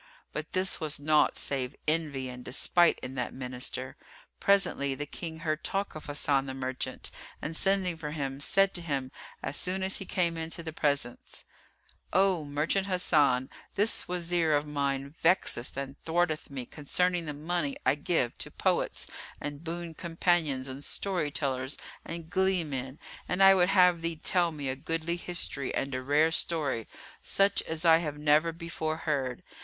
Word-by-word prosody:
But - - -5
this 185 0 +2
was 155 -3 0
naught 150 +1 +3
save 130 -2 -2
envy 150 -4 0
and 125 0 -8
despite 170 +7 +4
in 130 - -5
that 125 -2 -3
Minister. 130 0 -2 0.4
Presently 180 -9 +2
the 145 - -4
King 160 +2 -6
heard 155 -1 -1
talk 195 +1 -1
of 155 - -9
Hasan 140 -2 +1
the 130 - -4
Merchant 130 -1 -4 0.3
and 160 - -4
sending 195 -1 +2
for 155 -2 -5
him, 140 -3 -3
said 195 +6 +3
to 175 - -2
him 140 -5 -2 0.3
as 135 - 0
soon 190 +1 0
as 190 0 +2
he 195 - -5
came 170 -3 +1
into 165 +1 -4
the 160 -1 -5
presence, 140 -6 -1 0.7
"O 190 -3 +3
Merchant 150 +7 0
Hasan, 145 -8 +3 0.2
this 210 +3 +2
Wazir 175 -2 +1
of 145 0 +2
mine 140 -1 -2
vexeth 165 -8 +2
and 140 0 -4
thwarteth 165 -1 0
me 135 -3 -5
concerning 175 +4 0
the 150 - -3
money 155 -1 -2
I 130 - +5
give 150 -4 0
to - - -4
poets - - 0 0.3
and 145 +1 -6
boon 170 0 -4
companions 165 -5 0
and 135 +2 -6
story 180 -5 0
tellers 135 -2 -2 0.3
and 170 -1 -6
glee 190 0 +2
men, 135 -2 -5 0.3
and 185 +2 +3
I 195 0 +9
would 180 -1 +4
have 180 -3 +5
thee 165 0 -1
tell 175 +2 +2
me 145 -3 -5
a 130 - -1
goodly 165 +4 -1
history 170 -6 -2
and 135 0 -2
a 130 - -2
rare 150 +4 +3
story, 150 -9 -1 0.3
such 195 +1 +3
as 160 +1 -3
I 165 -1 +7
have 150 -3 -4
never 150 +2 +3
before 160 -1 -3
heard. 135 -6 -2
155 Hz, 170 wpm, -29 LUFS, 140-175 Hz, 0.7 s, I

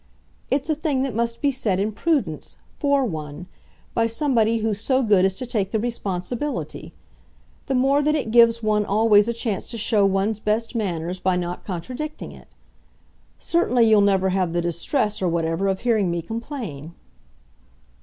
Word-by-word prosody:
It's 275 +2 0
a 315 - +2
thing 295 -3 -1
that 270 -3 -2
must 235 +1 -2
be 285 - +2
said, 220 -8 -1
in 205 +2 0
prudence, 310 +6 -2 0.2
FOR 280 -3 +1
one 155 -4 -6 0.5
by 230 0 +2
somebody 230 -2 +1
who's 215 -2 -2
so 260 +2 +1
good 205 -4 +4
as 190 0 +1
to 255 - -3
take 210 -6 -1
the 220 - -1
responsibility: 230 +4 -4 0.7
the 270 - 0
more 270 +3 +3
that 300 +1 +2
it 270 -7 -2
gives 230 -1 +5
one 210 -1 +2
always 210 +1 +4
a - - +1
chance 225 -4 -3
to 235 - -5
show 210 -1 +2
one's 195 +2 0
best 220 +2 -1
manners 180 -5 -3
by 185 0 +1
not 175 0 -4
contradicting 255 - -6
it. - - -15 0.9
Certainly, 250 -9 +2
you'll 215 -2 +5
never 195 -1 +3
have 185 -2 0
the 175 - +1
distress, 205 - -1
or 185 - +1
whatever, 165 +3 0
of 190 -1 -1
hearing 220 -6 +2
me 170 -1 -2
complain." 215 - -6
220 Hz, 170 wpm, -23 LUFS, 190-250 Hz, 0.9 s, gives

